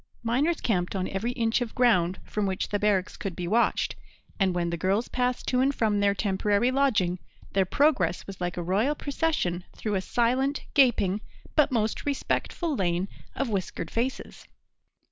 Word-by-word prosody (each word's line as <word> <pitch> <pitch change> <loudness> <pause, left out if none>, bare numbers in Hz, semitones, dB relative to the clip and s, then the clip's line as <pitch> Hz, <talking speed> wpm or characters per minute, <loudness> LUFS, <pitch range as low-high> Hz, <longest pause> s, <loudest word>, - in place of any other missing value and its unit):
Miners 275 +9 +1
camped 180 -4 0
on 185 -1 -1
every 210 +5 -2
inch 230 0 +1
of 235 -2 -4
ground 190 -8 +3
from 210 -1 -2
which 190 0 -2
the 205 - 0
barracks 205 -2 +1
could 195 -4 -5
be 175 - -4
watched; 230 +6 +1 0.4
and 190 -2 +2
when 170 -1 0
the - - -1
girls 195 +7 0
passed 250 0 -1
to 250 - +2
and 270 +2 +2
from 215 -2 +1
their 200 0 +3
temporary 205 +4 +1
lodging, 215 -10 +2 0.3
their 195 -1 +3
progress 190 - +2
was 195 -2 -9
like 175 0 -2
a 175 - -2
royal 210 - +1
procession 285 - -1
through 215 - -3
a 190 - +1
silent, 255 +7 +1
gaping, 215 -8 +3 0.3
but 300 -3 +4
most 220 -3 0
respectful 290 +3 -1
lane 180 -2 0 0.3
of 275 - -1
whiskered 185 -5 -3
faces. 250 +3 -3
210 Hz, 170 wpm, -27 LUFS, 185-250 Hz, 0.4 s, but